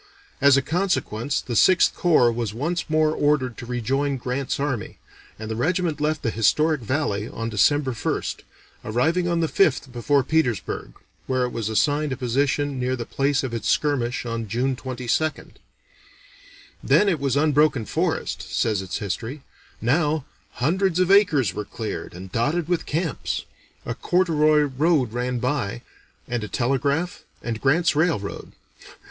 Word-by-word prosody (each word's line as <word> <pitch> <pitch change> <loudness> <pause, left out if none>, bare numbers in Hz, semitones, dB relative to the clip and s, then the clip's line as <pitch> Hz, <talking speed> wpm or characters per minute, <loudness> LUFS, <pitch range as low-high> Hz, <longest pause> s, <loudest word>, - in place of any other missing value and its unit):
As 140 -1 +6
a 140 - +1
consequence 155 - -1
the 120 - -5
Sixth 175 - +5
Corps 150 -9 +4
was 115 -3 -3
once 165 +7 -2
more 155 0 +3
ordered 145 -5 +1
to 120 - -8
rejoin 135 +3 -1
Grant's 130 +2 -3
army, 135 -7 -3 0.4
and 110 - -7
the - - -2
regiment 165 +4 0
left 150 0 0
the 115 - 0
historic 150 +7 +2
valley 115 -4 -1
on 115 0 -4
December 135 +6 +3
1st, 115 - -2 0.5
arriving 160 +11 +1
on 170 -1 +1
the 165 - +1
5th 145 -7 +1
before 135 +3 +1
Petersburg, 135 - -1 0.3
where 130 -1 +1
it 125 - -2
was 110 -2 -3
assigned 145 +7 +1
a 130 - -2
position 135 +2 0
near 125 +1 0
the 120 -2 -5
place 140 +2 0
of 130 -3 -4
its 115 - -2
skirmish 135 -4 0
on 115 -1 -3
June 125 +5 0
22nd. 130 +4 -3 1.3
"Then 205 - +4
it 175 -6 +1
was 135 -2 0
unbroken 150 -5 +3
forest," - - -1
says 110 -4 0
its 95 -1 -4
history; 115 +8 -5 0.4
"now, 150 +3 +1 0.3
hundreds 180 +6 +1
of 185 +1 +3
acres 150 - +4
were 105 - -4
cleared, 110 -3 -6
and 95 +1 -9
dotted 145 - 0
with 175 -1 -1
camps. 160 -3 -2 0.4
A - - -2
corduroy 155 -4 +3
road 145 -3 +1
ran 125 +1 -1
by, 120 -3 -2 0.4
and 120 -2 -2
a - - -4
telegraph, 140 - -1 0.2
and 115 -2 -4
Grant's 155 +4 +3
railroad. 150 - -1
135 Hz, 155 wpm, -23 LUFS, 120-155 Hz, 1.3 s, As